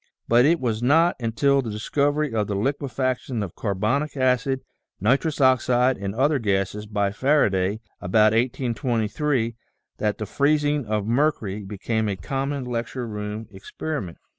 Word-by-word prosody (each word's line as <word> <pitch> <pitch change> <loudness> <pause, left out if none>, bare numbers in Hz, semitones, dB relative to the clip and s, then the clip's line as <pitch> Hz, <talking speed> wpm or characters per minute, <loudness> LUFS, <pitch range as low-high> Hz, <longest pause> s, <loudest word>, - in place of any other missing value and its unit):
But 120 +2 +5
it 165 +3 +3
was 115 -3 -1
not 160 +7 +4
until 135 +4 +2
the 120 - -5
discovery 145 +6 0
of 105 -2 0
the 100 - -2
liquefaction 130 0 -1
of 95 - -6
carbonic 115 +9 -1
acid, 130 +1 +1 0.4
nitrous 135 - +1
oxide, 130 -1 +3
and 100 +1 -4
other 140 +3 +2
gases 100 0 -1
by 100 -1 0
Faraday, 105 -6 +1 0.2
about 105 +4 +4
1823, 120 +1 0 0.4
that 105 -1 0
the 110 - -4
freezing 145 +2 +1
of 105 -1 -1
mercury 115 -5 0
became 105 +2 -2
a 100 - -1
common 135 +5 -3
lecture 120 +1 -3
room 105 0 -5
experiment. 95 - -5
120 Hz, 140 wpm, -24 LUFS, 105-140 Hz, 0.4 s, But